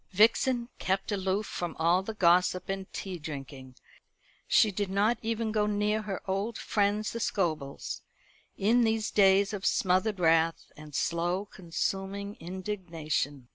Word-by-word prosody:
Vixen 235 +4 +3
kept 190 +2 -1
aloof 195 +1 0
from 175 -4 -4
all 170 +3 +3
the 220 +3 -6
gossip 180 0 +3
and 195 -1 -4
tea 185 -3 -5
drinking. 135 -4 -8 0.7
She 215 - +5
did 200 0 -2
not 210 +4 +2
even 225 0 -1
go 210 -1 +1
near 210 +1 +1
her 200 -3 -5
old 200 +4 -1
friends 210 +1 0
the 230 - -4
Scobels, 155 -10 -2 0.6
in 230 +5 +3
these 220 -1 0
days 195 0 +4
of 200 -2 -4
smothered 190 +2 +2
wrath 165 -1 +2
and 150 -1 -11
slow 175 +4 0
consuming 195 +2 -3
indignation. 165 - -3
195 Hz, 135 wpm, -29 LUFS, 170-210 Hz, 0.7 s, She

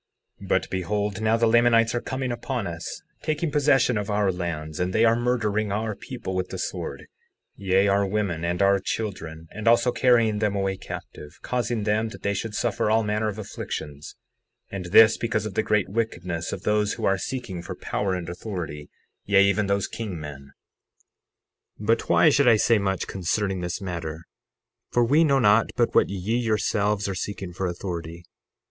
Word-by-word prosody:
60:17 - - -9
But - - +1
behold, 100 +2 -2
now 110 +1 +3
the 115 - +2
Lamanites 115 0 +4
are 120 - -1
coming 130 -1 -3
upon 120 -1 -3
us, 85 -2 -6 0.2
taking 155 0 -1
possession 135 -5 +3
of 105 - -4
our 105 -2 +2
lands, 80 -3 -4
and 90 +1 -1
they 115 - +4
are 115 0 +5
murdering 110 -4 0
our 105 +1 -2
people 120 -6 -6
with 95 -1 -2
the - - -5
sword, - - -5 0.5
yea, 95 +1 +2
our 100 0 +3
women 95 -4 -1
and 85 +3 0
our 100 0 +4
children, 85 -6 -5
and 110 +1 -6
also 120 +2 +5
carrying 115 -4 +3
them 105 -1 0
away 95 -1 0
captive, 75 -4 -9
causing 120 -3 -1
them 110 +2 +1
that - - -12
they 100 - +1
should 105 +2 -4
suffer 115 -2 0
all 110 +1 +3
manner 105 +1 0
of 105 -1 -4
afflictions, 75 -8 -6 0.6
and 95 -2 -5
this 110 +5 +6
because 110 -2 -1
of 105 - -5
the 110 - +1
great 105 -2 +1
wickedness 90 -6 -3
of - - -6
those 105 -1 +1
who - - -4
are 95 -1 +2
seeking 95 -5 -4
for - - -7
power 95 -2 -2
and 90 -2 -5
authority, 85 -5 -6 0.4
yea, 100 -1 +5
even 100 +1 +2
those 100 -1 0
king 105 -7 -5
men. 70 -2 -9 1.3
60:18 105 - -7
But 115 +1 +1
why 160 - +6
should 140 -2 +3
I 115 - +7
say 110 +1 +3
much 95 -1 -1
concerning 95 +1 -2
this 90 0 -3
matter? 85 -4 -5 0.7
For 120 - +2
we 145 +7 +4
know 140 -4 +3
not 110 -2 +4
but 120 -2 +1
what - - +4
ye 100 +4 -1
yourselves 105 -2 0
are 100 - -2
seeking 95 -1 -5
for 95 +1 -2
authority. 85 -1 -5
105 Hz, 185 wpm, -25 LUFS, 90-115 Hz, 1.3 s, I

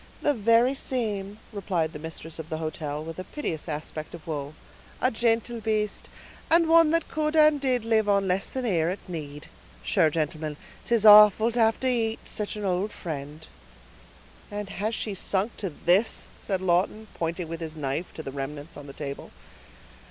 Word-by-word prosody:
"The 290 - +3
very 230 +2 +4
same," 210 -7 -3 0.2
replied 175 -6 -1
the 150 - -7
mistress 160 +1 -8
of 160 0 -7
the 160 - -2
hotel, 155 -2 -4
with 165 +2 -7
a - - -4
piteous 175 - -4
aspect 155 +1 -5
of 165 - -13
woe; 150 -2 -4 0.4
"a 255 - +2
gentle 230 0 0
baste, 215 -1 -1 0.4
and 335 0 +5
one 330 -1 +6
that 330 0 +1
could 310 0 -1
and 305 -2 +5
did 250 -4 +1
live 220 -2 +2
on 200 -1 +3
less 190 +1 0
than 260 -1 -3
air, 170 -7 +1
at 190 +3 -6
need. 150 -4 -7 0.4
Sure, 155 - +3
gentlemen, 155 -1 -3 0.3
'tis 230 -2 +2
awful 210 +2 +8
to 240 - -2
have 225 0 +3
to 260 - +1
eat 230 -3 0
sitch 210 0 -3
an 210 -1 -4
ould 190 +3 0
friend." 150 -2 -7 1.0
"And 205 -2 -5
has 215 +3 -2
she 215 - -3
sunk 195 +3 -1
to 195 - -3
this?" 180 +7 +2
said 190 -2 -2
Lawton, 190 +4 +1
pointing 165 +1 -3
with 165 0 -5
his 160 -1 -6
knife, 145 +4 -2
to 160 - -6
the 135 - -6
remnants 145 +3 -6
on 145 -1 -10
the 140 - -9
table. 140 -1 -6
195 Hz, 180 wpm, -26 LUFS, 160-225 Hz, 1.0 s, awful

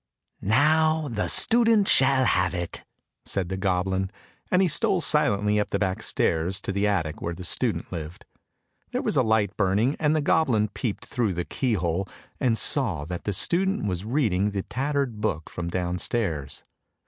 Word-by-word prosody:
" - - -61
Now 155 +7 +2
the 105 -3 -1
student 230 -3 +4
shall 130 0 +4
have 90 -4 +2
it," 85 -1 -5 0.4
said 95 -3 -2
the 95 - -2
goblin, 95 0 -1 0.4
and 185 +1 +3
he - - +3
stole 175 +3 +2
silently 105 -10 +2
up 105 - -1
the - - 0
back 95 -2 -1
stairs 85 +4 0
to - - -4
the 100 +2 0
attic 85 -7 -1
where 85 0 -3
the 90 - -8
student 90 - -1
lived. 80 +1 -7 0.7
There - - -2
was - - 0
a - - +4
light 110 -3 +1
burning, 105 +9 +1
and 155 0 +2
the - - +2
goblin 125 -9 +2
peeped 110 -1 -4
through 110 -7 -1
the 85 0 -3
key 125 - -1
hole, 90 0 -1 0.3
and 120 -3 +1
saw 100 - 0
that 90 +1 -6
the 105 - 0
student 190 - +1
was 90 -2 -2
reading 105 -5 0
the 100 -2 -3
tattered 135 -4 -2
book 80 -6 -2
from 90 -1 -5
downstairs. 90 - -3
105 Hz, 175 wpm, -25 LUFS, 90-135 Hz, 0.7 s, student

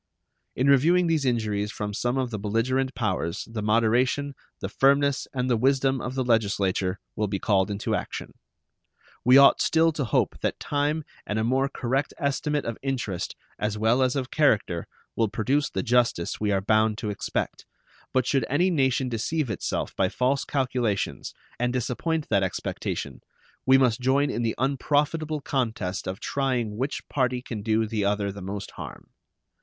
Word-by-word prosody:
In 130 - +1
reviewing 165 +7 +5
these 160 -4 +1
injuries 105 -4 0
from 105 -1 -4
some 120 +5 -1
of 130 -2 -1
the 105 - -3
belligerent 125 +6 0
powers 95 -7 -2
the 115 -2 -5
moderation, 120 +6 +2 0.3
the - - -3
firmness, 140 +5 +2
and 125 -1 -1
the 125 - +3
wisdom 135 +2 +2
of 125 +2 -4
the 130 - 0
Legislature 100 -5 +1 0.2
will 105 -1 0
be 100 0 -2
called 95 -1 +2
into 100 0 -2
action. - - -4 0.9
We 125 +2 +7
ought 140 0 +7
still 165 0 +3
to 150 -3 -2
hope 110 - 0
that - - -1
time 145 +2 -1 0.2
and 105 - -1
a 110 - +1
more 130 +4 +1
correct 135 +2 -2
estimate 145 +1 -1
of 115 - -4
interest 125 -9 -3 0.2
as 105 0 -1
well 110 +4 +3
as 130 0 +2
of 130 -2 -3
character 105 - +2 0.3
will 115 - +2
produce 135 +8 0
the - - -2
justice 120 -8 +1
we 105 -1 0
are 95 -1 +1
bound 110 +1 +2
to 105 -2 -3
expect, 100 - -3 0.4
but 130 -1 +2
should 135 -1 +1
any 175 +8 +2
nation 135 -4 +2
deceive 125 +3 -1
itself 100 - -3
by 95 -1 +2
false 130 +5 0
calculations, 125 -7 -1 0.2
and 125 0 +1
disappoint 150 +6 -1
that 100 - +3
expectation, 95 - -3 0.5
we 130 0 +7
must 125 -3 +2
join 135 +3 +2
in 120 - -2
the 115 -1 0
unprofitable 150 +3 0
contest 115 -10 -2
of 95 +2 -4
trying 125 -6 -1
which 130 +6 -3
party 130 -2 0
can 110 -5 -5
do 110 +1 +1
the 110 -1 -2
other 100 0 0
the 100 +1 -9
most 100 +2 -5
harm. - - -10
125 Hz, 170 wpm, -26 LUFS, 105-135 Hz, 0.9 s, We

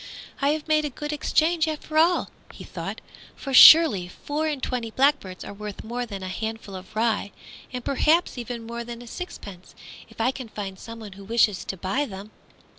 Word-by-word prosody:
"I 280 - +3
have 310 0 -5
made 310 -1 +3
a 295 - -2
good 295 +3 -5
exchange, 320 +2 +1
after 310 0 -5
all," 335 +3 +3 0.2
he - - -11
thought, - - -6 0.3
"for 275 - -6
surely 260 - +9
four 295 - -3
and 300 -2 -1
twenty 245 -3 -2
blackbirds 260 -7 +1
are - - -7
worth 210 0 -8
more 240 +2 -4
than 200 -3 -7
a - - -4
handful 220 +1 -5
of 185 +2 -10
rye, 220 -2 0 0.4
and 250 -2 -6
perhaps 315 +5 +2
even 240 -2 -6
more 235 +1 -5
than 235 0 -8
a - - -12
sixpence, 200 - -9 0.3
if 225 - -18
I 235 +3 +2
can 255 -3 -8
find 195 -3 -7
anyone 225 -3 -9
who 200 +1 -12
wishes 215 -2 +2
to 190 - -5
buy 195 +11 -1
them." 200 +1 -9
235 Hz, 190 wpm, -25 LUFS, 205-295 Hz, 0.4 s, surely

